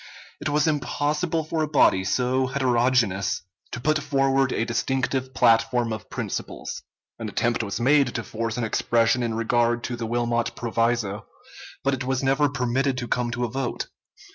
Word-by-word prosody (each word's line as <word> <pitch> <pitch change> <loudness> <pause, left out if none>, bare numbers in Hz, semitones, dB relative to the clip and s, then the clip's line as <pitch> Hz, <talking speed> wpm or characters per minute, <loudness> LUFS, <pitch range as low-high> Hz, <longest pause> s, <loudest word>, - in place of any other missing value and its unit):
It - - -2
was 150 +2 +2
impossible 155 +2 0
for 160 +1 -2
a 155 - +1
body 140 -10 +4
so 130 +5 +1
heterogeneous 125 -7 +1 0.3
to 120 - -5
put 155 +5 +1
forward 135 -2 +2
a 115 - 0
distinctive 130 +2 -1
platform 115 0 +3
of 110 - -7
principles. - - -5 0.4
An 110 -2 -4
attempt 120 +3 0
was 100 -1 -3
made 140 +3 +4
to 115 - -2
force 115 +1 -4
an 120 - -1
expression 115 +2 +2
in 115 -2 -1
regard 120 +1 +1
to 120 - -3
the 115 -1 -4
Wilmot 120 0 0
proviso, 115 -3 -1 0.6
but 140 +1 +2
it 130 0 -2
was 130 +1 -1
never 135 +2 +3
permitted 130 0 0
to 120 -1 -3
come 120 0 0
to 120 0 -1
a - - -2
vote. 130 +2 -3
125 Hz, 165 wpm, -24 LUFS, 115-135 Hz, 0.6 s, body